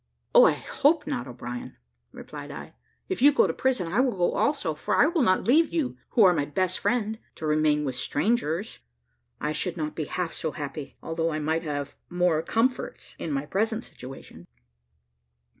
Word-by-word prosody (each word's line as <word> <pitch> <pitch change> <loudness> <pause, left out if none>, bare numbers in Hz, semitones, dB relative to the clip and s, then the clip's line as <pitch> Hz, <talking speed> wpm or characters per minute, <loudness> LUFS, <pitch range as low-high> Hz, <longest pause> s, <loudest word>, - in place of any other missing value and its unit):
"I - - +8
hope 315 - +1
not, 280 - -3
O'Brien," 120 0 -7 0.3
replied - - -9
I; - - -8 0.3
"if - - -3
you 290 +2 +8
go 290 - +4
to - - -1
prison, 260 -8 0
I 190 +8 0
will 255 -1 +3
go 175 - +2
also, 280 - +1
for 150 - -1
I - - +6
will 330 +1 +1
not 185 -6 +3
leave 305 +7 +4
you, 310 -7 -1 0.2
who 230 - +6
are 185 -2 +7
my 145 -4 0
best 185 +5 -1
friend, 220 -2 0 0.2
to 160 - -6
remain 150 -1 +2
with 135 - -2
strangers; 170 - -1 0.6
I 150 - -1
should 175 +3 -1
not 155 -1 -3
be 155 - -3
half 175 +2 -3
so 160 - -3
happy, 145 -1 -6
although 165 0 -1
I 155 - -2
might 160 +2 0
have 145 -3 -4
more 175 -3 +2
comforts 230 +9 -1
in 160 - -3
my 140 0 -1
present 220 +7 -1
situation." 130 +2 -11
175 Hz, 180 wpm, -26 LUFS, 150-245 Hz, 0.6 s, I